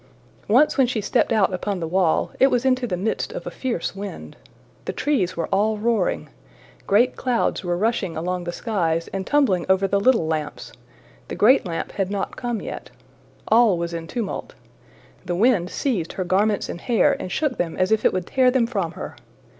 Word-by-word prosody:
Once 265 +7 +4
when 260 - +5
she 240 -2 -1
stepped 225 +4 +1
out 205 -4 +3
upon 190 +1 -2
the 165 - -3
wall, 175 -1 +1
it 265 - +7
was 250 -1 0
into 255 -1 +2
the 180 -5 -2
midst 210 +5 -2
of - - -6
a - - -5
fierce 235 -9 -3
wind. 200 0 -7 0.5
The - - -3
trees 235 - 0
were 165 - 0
all 210 +2 +1
roaring. 220 -3 0 0.6
Great 230 +5 +3
clouds 245 -5 0
were 175 -1 -1
rushing 200 -5 -1
along 180 +2 -3
the 175 - -3
skies 170 -5 -1
and 190 -1 -4
tumbling 260 -12 +2
over 190 +1 +3
the 200 +1 +1
little 225 -4 +3
lamps: 155 -2 -4 0.6
the - - -5
great 235 -1 +4
lamp 165 -1 -4
had 195 -2 -2
not 200 -1 -3
come 240 -3 -3
yet. - - -7 0.6
All 225 -4 +5
was 170 0 -3
in 165 -1 -5
tumult. 225 0 -5 0.7
The 180 -1 -3
wind 200 -3 +3
seized 205 - -2
her 185 - -2
garments 200 +4 +1
and 170 - -7
hair 235 -3 +3
and 185 - -6
shook 295 - -1
them 170 -2 -2
as 185 +3 +1
if 220 - +2
it - - +4
would 185 -1 -2
tear 255 +4 +3
them 250 -2 +2
from 195 -8 -2
her. - - -7
200 Hz, 195 wpm, -23 LUFS, 180-240 Hz, 0.7 s, it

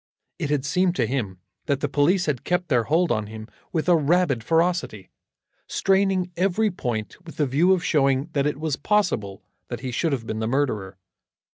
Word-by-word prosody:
It 155 -5 -2
had 145 -2 0
seemed 180 +4 +1
to 125 - +1
him 110 -7 -3 0.3
that 140 -2 +1
the 145 - +1
police 155 +7 +2
had 145 -6 -2
kept 180 -1 -1
their 120 -5 +2
hold 165 +5 +2
on 110 -3 -1
him 110 0 -9 0.2
with 160 0 -1
a 175 - +6
rabid 155 -5 +2
ferocity, 165 - 0 0.6
straining 190 -2 +1
every 195 +4 +1
point 120 - -4
with 165 - -12
the 150 - +2
view 150 +8 +3
of 185 -2 +2
showing 140 0 +2
that 140 0 +1
it 150 -1 -2
was 155 -3 -1
possible 145 - 0 0.2
that - - -6
he 130 - -4
should 160 +7 0
have 125 -5 -2
been 110 - -4
the 110 - -1
murderer. 110 -8 -1
145 Hz, 190 wpm, -24 LUFS, 120-180 Hz, 0.6 s, a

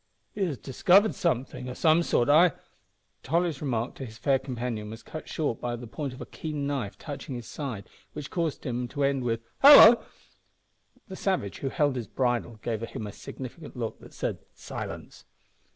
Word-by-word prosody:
"He 205 - -1
has 150 -7 -3
discovered 185 - +4
something 130 -5 -2
o' 125 - -6
some 160 +1 +4
sort, 120 -7 +1
I 155 +3 +6 0.3
" 105 +1 -46
Tolly's 165 0 0
remark 120 -4 -1
to 135 - -5
his 110 0 -12
fair 135 +1 +2
companion 120 -5 -4
was 110 +1 -9
cut 155 - -8
short 145 -7 -2
by 120 -1 -2
the 120 +1 -8
point 140 +4 -5
of 130 - -11
a - - -6
keen 150 -3 -5
knife 135 -8 -3
touching 140 -3 -7
his 120 -1 -6
side, 125 -9 -5 0.3
which 150 -1 -7
caused 165 -4 -2
him 125 -1 -2
to 140 +3 -3
end 140 -2 +1
with 115 -1 -1 0.2
"hallo!" 270 -5 +10 1.0
The 190 - -7
savage 185 - -1
who 135 - -2
held 145 -1 +1
his 120 - -4
bridle 120 -3 -1
gave 115 -2 -2
him 115 -1 -5
a 105 - -6
significant 135 - -9
look 115 -2 -4
that - - -15
said, - - -2 0.2
"Silence!" - - -8
130 Hz, 185 wpm, -27 LUFS, 120-155 Hz, 1.0 s, hallo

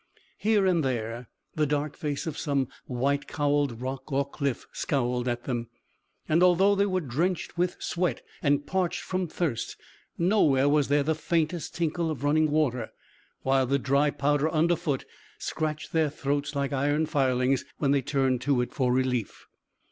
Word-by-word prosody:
Here 210 -2 +3
and 175 -4 +3
there 120 -2 -3 0.2
the 150 -1 +1
dark 145 +1 -1
face 150 -4 -3
of 160 -3 -3
some 140 -5 -1 0.2
white 140 +3 0
cowled 145 -5 0
rock 135 +2 -5
or 140 0 +1
cliff 140 -3 -3
scowled 125 -3 -1
at 120 0 -1
them, 120 -3 -3 0.6
and 160 +3 +3
although 180 +3 +5
they 200 0 +2
were 185 -1 0
drenched 165 +7 -1
with 180 +1 0
sweat 175 -7 -1 0.2
and 145 0 +2
parched 185 0 -1
from 185 -1 -2
thirst, 155 -7 -2 0.4
nowhere 160 -7 +3
was 145 -1 +3
there 145 0 +3
the 160 +3 +1
faintest 165 +1 -1
tinkle 170 0 0
of 145 -4 -4
running 155 +2 +3
water, 130 -7 0 0.5
while 135 -1 +2
the 140 +2 +2
dry 140 +2 +2
powder 145 +2 +1
under 165 +2 +3
foot 155 -5 -2 0.3
scratched 155 -1 -3
their 160 -2 +3
throats 145 0 -2
like 140 0 -1
iron 145 +3 +1
filings 130 -2 +1
when 140 -2 +1
they 140 -1 +3
turned 130 -2 +1
to 140 0 +2
it 125 - -4
for 125 -2 +1
relief. 125 -4 -1
145 Hz, 165 wpm, -27 LUFS, 130-160 Hz, 0.6 s, although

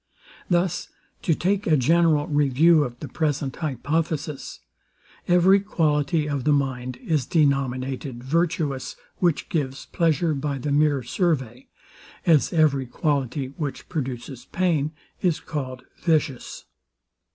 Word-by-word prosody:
Thus, 175 0 +1 0.3
to 165 - +2
take 195 +4 0
a 155 -2 +4
general 155 +2 +3
review 150 +2 +4
of 120 -3 -6
the 150 - -5
present 145 -4 -2
hypothesis: 155 - -2 0.7
Every 180 +3 +5
quality 155 -5 +1
of 140 -3 -2
the 150 - +2
mind 130 -3 -1
is 150 -6 0
denominated 135 -4 0
virtuous, 150 -3 -1 0.2
which 175 -4 +1
gives 140 -4 -2
pleasure 165 -1 +1
by 140 0 -2
the 140 +3 -3
mere 145 -2 +3
survey; 130 - -1 0.6
as 160 -4 +4
every 145 -6 +2
quality, 135 -1 -1
which 145 -4 -5
produces 130 -4 -5
pain, 160 -5 0 0.3
is 175 -4 +1
called 130 -5 -5 0.2
vicious. 155 -6 -1
150 Hz, 120 wpm, -24 LUFS, 135-165 Hz, 0.7 s, Every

